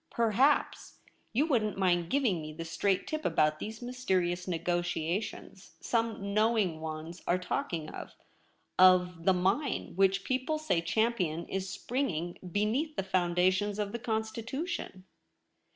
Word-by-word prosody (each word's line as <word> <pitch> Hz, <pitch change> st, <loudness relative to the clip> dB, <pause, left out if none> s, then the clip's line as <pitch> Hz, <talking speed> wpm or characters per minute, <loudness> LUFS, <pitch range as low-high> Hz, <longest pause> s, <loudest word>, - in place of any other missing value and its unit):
Perhaps 235 Hz, +6 st, +1 dB, 0.3 s
you 265 Hz, +7 st, +2 dB
wouldn't 220 Hz, -10 st, +1 dB
mind 175 Hz, -3 st, +2 dB
giving 240 Hz, -, +1 dB
me 155 Hz, 0 st, -7 dB
the 165 Hz, +2 st, -6 dB
straight 185 Hz, +4 st, 0 dB
tip 310 Hz, 0 st, -3 dB
about 155 Hz, 0 st, +2 dB
these 220 Hz, +2 st, -6 dB
mysterious 185 Hz, -8 st, -1 dB
negotia 175 Hz, +1 st, 0 dB
tions 195 Hz, -3 st, -10 dB
some 225 Hz, -4 st, -1 dB
knowing 215 Hz, -6 st, +2 dB
ones 160 Hz, +2 st, -6 dB
are 175 Hz, -, +3 dB
talking 180 Hz, -, -3 dB
of -, -, -9 dB, 0.4 s
— -, -, -24 dB
of 180 Hz, -2 st, +5 dB
the 190 Hz, -, +6 dB
mine 190 Hz, +11 st, 0 dB
which 195 Hz, +1 st, +3 dB
people 260 Hz, +4 st, -1 dB
say 305 Hz, -, 0 dB
Champion 175 Hz, -3 st, 0 dB
is 190 Hz, 0 st, -3 dB
springing 175 Hz, -, -2 dB
beneath 240 Hz, -, 0 dB
the 195 Hz, -, -1 dB
foundations 185 Hz, +2 st, +1 dB
of 205 Hz, -1 st, -2 dB
the 235 Hz, -, -4 dB
Con 220 Hz, -2 st, 0 dB
stitution.' 230 Hz, -, -5 dB
195 Hz, 140 wpm, -31 LUFS, 175-230 Hz, 0.4 s, the